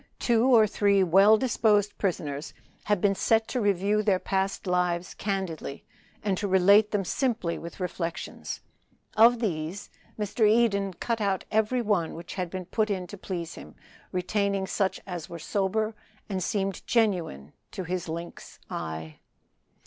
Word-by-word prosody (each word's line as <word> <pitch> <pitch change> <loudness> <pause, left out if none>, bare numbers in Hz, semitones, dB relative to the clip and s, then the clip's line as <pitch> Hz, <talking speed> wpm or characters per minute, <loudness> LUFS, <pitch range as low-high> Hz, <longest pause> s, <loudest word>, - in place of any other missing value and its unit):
Two 235 -1 +2
or 235 -4 +7
three 200 -2 +3
well 195 +5 +6
disposed 210 -4 +2
prisoners 150 -6 -3 0.3
had 205 -3 +1
been 200 -1 +3
set 220 +3 +2
to 250 - -1
review 205 +1 +2
their 200 -3 +2
past 195 +2 -2
lives 180 -1 0
candidly, 190 -8 -4 0.4
and 195 -3 0
to 205 - -1
relate 200 +3 +5
them 205 -3 -1
simply, 225 -6 -1
with 170 +3 -9
reflections. 175 -2 -4 0.5
Of 235 +2 +7
these 175 -2 -3 0.3
Mr. 210 +1 +2
Eden 200 -4 +2
cut 230 +4 -2
out 195 -2 0
every 220 +3 +1
one 200 -7 0
which 170 +1 -8
had 180 -2 -3
been 185 0 -5
put 215 +4 0
in 190 -3 -2
to 205 - -9
please 175 -4 -5
him, 75 - -12 0.4
retaining 200 +1 0
such 190 0 -1
as 175 -4 -6
were 170 - -6
sober 205 +5 -1 0.3
and 190 -3 -3
seemed 195 0 -1
genuine 175 - 0 0.2
to 190 - -5
his 180 -1 -3
lynx 170 +2 -7
eye. 80 -1 -5
195 Hz, 150 wpm, -27 LUFS, 175-210 Hz, 0.5 s, or